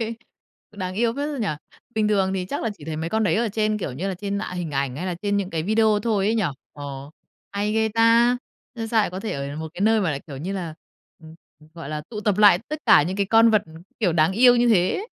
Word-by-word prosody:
Hê, 230 0 -2 0.6
đáng 185 -3 -5
yêu 230 +3 +1
phết 290 +1 -2
ra 290 - -4
nhỉ? 215 -4 -1 0.5
Bình 215 -1 +1
thường 195 -2 +1
thì 185 -1 -3
chắc 285 - -4
là 225 - -1
chỉ 145 - -12
thấy 155 -1 -4
mấy 160 +2 -4
con 220 0 +1
đấy 170 -5 +2
ở 230 0 +1
trên, 215 0 0
kiểu 145 - -4
như 175 +10 -4
là, 190 - -2
trên 200 +2 -3
ả 180 - -5
hình 175 -3 -4
ảnh 135 -2 -2
hay 180 +5 -4
là 180 - -2
trên 205 -1 0
những 195 -2 -2
cái 160 -3 -2
video 215 +2 +2
thôi 205 -4 +1
ấy 220 - +2
nhỉ? 215 - +1 0.3
Ờ, 140 -1 -8 0.4
hay 205 +1 -1
ghê 220 0 +1
ta! 230 +2 +4 0.4
Nhưng 225 -2 -5
sao 225 0 +3
lại 205 - 0
có 185 +2 -6
thể 220 - -4
ở 140 0 -4
được 145 - -7
một 160 - -5
cái - - -9
nơi 220 +2 +3
mà 185 -5 0
lại, 140 -2 -3
kiểu 140 - -8
như 170 +8 -4
là, 175 -5 -5 0.4
ừ, 160 - -16 0.3
ừ, 155 - -18
gọi 165 -4 -8
là, 150 0 -4
tụ 210 -3 -5
tập 210 -2 0
lại 205 -4 +7
tất 305 - -4
cả - - +7
những 180 +5 -3
cái 200 -1 0
con 225 +2 +5
vật, 215 -2 +3
ừu, 160 - -15 0.3
kiểu, 185 -7 +2
đáng 160 +2 +3
yêu 245 +4 +6
như 240 0 +3
thế. 220 - +2
200 Hz, 285 wpm, -23 LUFS, 165-220 Hz, 0.6 s, lại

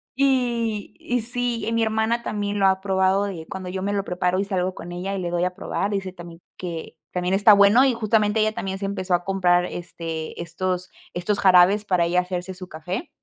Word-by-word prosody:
y 240 -6 0
y 245 0 -1
sí, 240 0 -2
mi 230 - +2
hermana 220 +2 0
también 205 -1 -2
lo 195 - +5
ha 190 0 +2
probado 190 0 +2
de 170 -5 -6
cuando 185 -1 -6
yo 185 +1 -4
me 205 +1 -1
lo 200 -1 0
preparo 180 +1 0
y 195 - +1
salgo 185 -2 -1
con 175 - -8
ella 185 +3 -3
y - - -3
le 175 - -2
doy 175 0 0
a 180 0 -3
probar, 200 0 -2
dice 195 -2 -2
también, 175 -1 -11 0.2
que 170 -3 -6 0.2
también 180 +1 0
está 205 +1 +7
bueno, 205 +6 +6
y 260 - +3
justamente 215 -1 +1
ella 215 0 +2
también 195 -1 -4
se 200 - -3
empezó 190 -2 -2
a 175 0 +2
comprar, 180 -2 +2
este, 165 -2 -6
estos 180 +2 -3 0.2
estos 200 +4 -1
jarabes 190 +3 +5
para 180 -3 +2
ella 180 +1 +2
hacerse 180 0 -5
su 185 -1 -9
café 175 - -5
190 Hz, 215 wpm, -23 LUFS, 180-210 Hz, 0.2 s, está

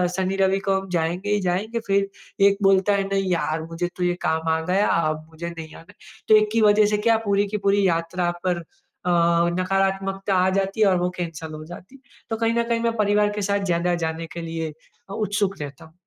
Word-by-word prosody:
शनी 190 0 -1
रवि 195 0 +2
को 195 0 +3
हम 195 0 -10
जाएँगे 175 +3 -1
ही 210 - +2
जाएँगे, 195 +6 -1
फिर 195 0 +2 0.4
एक 200 0 +2
बोलता 195 +1 +4
है, 200 -1 +1
"नहीं 195 -1 -1
यार 160 -2 0
मुझे 165 +2 -3
तो 180 - -2
ये 175 0 +2
काम 160 -1 0
आ 160 - +1
गया, 190 +4 +2
अब 155 -1 0
मुझे 165 +1 -6
नहीं 165 -2 -9
आना 165 - -13
है।" - - -27 0.3
तो 215 - +7
एक 215 0 +2
की 230 - +3
वज़ह 210 0 +5
से - - +1
क्या 225 +2 +3
पूरी 200 0 +2
की 210 +2 -3
पूरी 200 0 +4
यात्रा 175 +1 0
पर 180 -1 +1 0.5
अ, 180 - +2 0.5
नकारात्मकता 195 +1 0
आ 185 0 +3
जाती 195 +2 -1
है 210 - +6
और 185 -2 +3
वो 180 0 0
कैंसल 165 -2 -5
हो 155 0 -7
जाती 175 +8 -12
है। 270 - -18 0.3
तो 225 - -1
कहीं 230 0 +1
ना 235 0 +1
कहीं 235 0 -1
मैं 230 0 0
परिवार 210 0 +3
के 210 - -2
साथ 200 0 0
ज़्यादा 175 -1 +1
जाने 160 +1 -3
के 170 - -5
लिए 165 -1 -4 0.4
अ, - - -6
उत्सुक 205 -2 -1
रहता 140 -1 -8
हूँ। 160 - -19
190 Hz, 230 wpm, -23 LUFS, 170-205 Hz, 0.5 s, तो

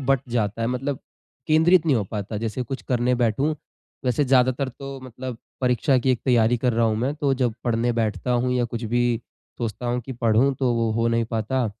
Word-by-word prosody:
बँट 135 -1 +2
जाता 115 -2 -1
है 115 - +1
मतलब 130 +2 -2 0.5
केंद्रित 160 +2 +4
नहीं 145 -5 +4
हो 105 - 0
पाता 105 0 -4
जैसे 115 +3 -3
कुछ 130 +2 -6
करने 125 0 +2
बैठूँ, 125 +6 +1 0.5
वैसे 125 +3 +2
ज़्यादातर 130 0 +3
तो 135 +2 -8
मतलब 130 -1 -7 0.2
परीक्षा 130 +2 +2
की 130 +2 +1
एक 125 - +1
तैयारी 120 -2 +3
कर 125 0 +1
रहा 115 +1 +2
हूँ 110 - +1
मैं 130 +6 -1
तो 145 -2 0
जब 125 -4 0
पढ़ने 120 0 +1
बैठता 115 +1 -1
हूँ 125 +1 +1
या 125 -1 +2
कुछ 120 0 -5
भी 120 +2 +1 0.6
सोचता 120 +1 -4
हूँ 120 +1 0
कि 130 +3 -7
पढ़ूँ 120 +3 +2
तो 130 -3 +2
वो 115 -1 +1
हो 115 +1 +1
नहीं 115 0 +1
पाता। 115 +3 -1
125 Hz, 210 wpm, -24 LUFS, 115-130 Hz, 0.6 s, केंद्रित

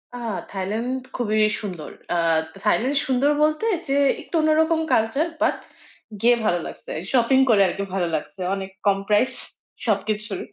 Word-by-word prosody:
আহ! 230 -3 -4 0.2
Thailand 220 +7 -2 0.2
খুবই 215 -3 0 0.2
সুন্দর। 180 -8 -6 0.2
আহ! 165 -1 +3 0.2
Thailand 245 +6 +2
সুন্দর 265 +2 +2
বলতে 310 +7 +1 0.2
যে 275 - 0 0.3
একটু - - -7
অন্যরকম 320 +1 +3
culture, 275 +10 +1
but 325 - +3 0.7
গিয়ে 240 +1 +5
ভালো 175 -4 +2
লাগছে। - - -10 0.2
Shopping 260 +1 +4
করে 210 -3 +5
আরকি 195 +2 -3
ভালো 185 -2 0
লাগছে 190 +5 -6
অনেক 195 -1 -5 0.2
কম 200 -1 +4
price 210 +5 +3 0.5
সবকিছুর। 210 -1 -1
220 Hz, 145 wpm, -23 LUFS, 195-265 Hz, 0.7 s, গিয়ে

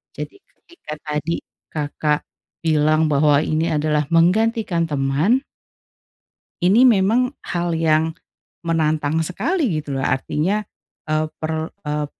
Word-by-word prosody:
Jadi, 395 - -7
ketika 345 - -12
tadi 150 +2 -2 0.2
Kakak 150 0 -1 0.4
bilang 155 0 +3
bahwa 145 +1 +4
ini 160 +1 0
adalah 150 -2 0
menggantikan 180 - +2
teman 150 - +1 1.2
ini 205 +8 +5
memang 240 +4 +3
hal 175 -1 -2
yang 160 0 +2 0.5
menantang 155 -1 +1
sekali 195 - 0
gitu 145 -1 -7
loh, - - 0
artinya, 155 +10 0 0.4
eee, 155 0 0
per 160 0 -3 0.2
eee, 150 0 -1
160 Hz, 110 wpm, -21 LUFS, 150-185 Hz, 1.2 s, ini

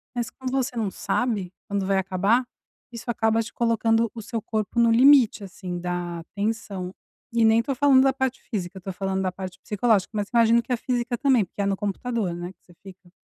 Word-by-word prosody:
mas 240 -1 -2
como 260 -1 -6
você 265 -1 -1
não 220 -4 -1
sabe 200 -2 -2
quando 200 -1 -1
vai 195 0 +1
acabar, 195 +6 +2 0.5
isso 235 -2 -9
acaba 225 0 +1
te 230 - -10
colocando 230 -1 +2
o - - -6
seu 225 +1 -4
corpo 215 +2 -2
no 235 0 +5
limite, 245 -3 +6
assim, 185 -2 -6
da 175 -1 -4
tensão, 200 -3 -3 0.4
e 230 -1 +3
nem 220 +1 +5
tô 270 +3 -3
falando 270 0 +5
da 270 - +4
parte 265 -1 -2
física, 190 -3 -5
eu - - -6
estou 190 0 -6
falando 190 0 -2
da 185 -1 -1
parte 185 0 -8
psicológica, 210 -1 +1
mas 205 -1 -2
imagino 235 0 +4
que 255 - -9
a - - +1
física 240 0 -1
também, 255 -5 +3
porque 195 - -6
é - - +1
no 195 -1 0
computador, 205 -1 -2
né, 175 +1 -6
que - - -53
você 175 - -20
fica? 185 -2 -14
220 Hz, 215 wpm, -24 LUFS, 190-235 Hz, 0.5 s, limite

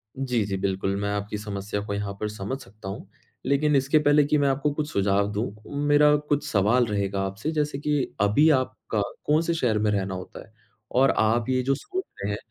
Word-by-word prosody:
जी, 125 -4 0
जी 95 -1 -2
बिल्कुल 95 0 -1
मैं 100 - -1
आपकी 105 +1 -3
समस्या 105 0 -4
को 100 - -3
यहाँ 100 -1 -3
पर 105 - -1
समझ 105 +5 -4
सकता 100 -2 -10
हूँ। 100 0 -7 0.4
लेकिन 145 +2 +2
इसके 135 +3 +3
पहले 145 0 +4
कि 150 +1 +2
मैं 145 - +2
आपको 140 +2 0
कुछ 150 +1 -3
सुझाव 100 -1 +1
दूँ, 105 +1 -2 0.3
मेरा 150 0 +5
कुछ 145 +1 +1
सवाल 115 +1 +3
रहेगा 100 -2 -1
आपसे, 105 +11 -3
जैसे 150 -2 -1
कि 145 -2 -1
अभी 105 +10 +4
आपका 130 -6 0 0.2
कौन-से 165 +3 +2
शहर 120 -9 +1
में 105 0 +1
रहना 95 -2 -1
होता 90 - -8
है? 110 - -26 0.4
और 135 +2 +4
आप 115 +2 +2
ये 130 -1 +2
जो 135 +2 +2
सोच 370 - -5 0.2
रहे 100 - -1
हैं 100 - -3
110 Hz, 205 wpm, -25 LUFS, 100-145 Hz, 0.4 s, मेरा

